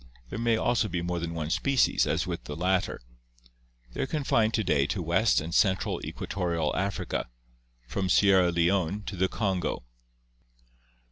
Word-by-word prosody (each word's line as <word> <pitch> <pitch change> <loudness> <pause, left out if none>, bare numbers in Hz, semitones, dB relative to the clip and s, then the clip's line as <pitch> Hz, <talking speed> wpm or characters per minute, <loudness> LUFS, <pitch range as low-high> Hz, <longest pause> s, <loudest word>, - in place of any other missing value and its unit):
There - - -4
may 115 -1 +2
also 120 -1 +1
be 85 -3 -3
more 90 0 -2
than 85 0 -4
one 80 -1 -3
species 135 +5 +2
as - - 0
with - - -5
the 75 - -6
latter. 90 -4 0 0.9
They - - -3
are - - -1
con 150 +1 -2
fined 110 -4 +2
to 110 - +1
day 70 -6 +2
to 95 - -2
west 90 +6 +2
and 80 +2 -5
central 95 -1 +1
equatorial 85 -5 -2
Africa, 95 -8 -2 0.6
from 95 +8 -2
Sierra 95 -1 +5
Leone 90 +3 +1
to 100 - -6
the 95 +1 +1
Kongo. 95 - -2
95 Hz, 160 wpm, -28 LUFS, 85-105 Hz, 0.9 s, Sierra